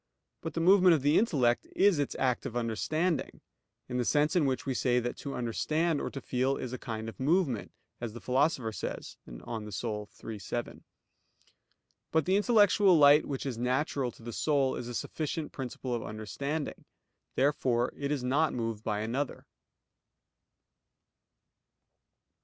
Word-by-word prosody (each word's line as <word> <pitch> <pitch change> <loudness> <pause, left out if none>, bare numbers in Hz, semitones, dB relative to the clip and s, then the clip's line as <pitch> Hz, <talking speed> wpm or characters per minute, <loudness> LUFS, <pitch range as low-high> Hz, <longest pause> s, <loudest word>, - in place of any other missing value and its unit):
But - - -5
the 165 - 0
movement 185 0 +6
of 145 - -2
the 145 +2 +5
intellect 130 - +2
is 195 -5 +4
its 145 - -1
act 130 0 0
of 120 - -8
understanding; 155 +8 -1 0.5
in 125 - -3
the 125 - +1
sense 150 +7 +2
in 160 -6 +3
which 130 -1 -1
we 135 - -1
say 125 0 +2
that 120 0 -3
to 140 - -5
understand 155 +7 0
or - - -2
to 135 - -6
feel 130 +1 0
is 130 -1 -5
a 130 - -4
kind 110 -2 -5
of 115 - -8
movement, 145 - +1 0.3
as 120 -3 -5
the 120 - -7
Philosopher 130 -2 +1
says - - -6
(De - - -10
Anima 110 -3 -5 0.6
iii, 110 -2 -5
7). 120 +5 -5 1.3
But 160 -2 +2
the 190 - +2
intellectual 205 -3 +5
light 145 0 +7
which 135 -1 -4
is 125 -4 -3
natural 130 +1 0
to - - -17
the 120 0 -6
soul, 140 -2 +1
is 120 - -5
a 120 - -5
sufficient 155 +5 -3
principle 130 -1 -5
of 120 - -1
understanding. 140 +9 -4 0.5
Therefore 130 -3 +1
it 140 0 -3
is 140 -4 -1
not 145 +5 +2
moved 115 -3 -3
by 105 -2 -1
another. 130 +6 -3
130 Hz, 160 wpm, -30 LUFS, 120-155 Hz, 1.3 s, light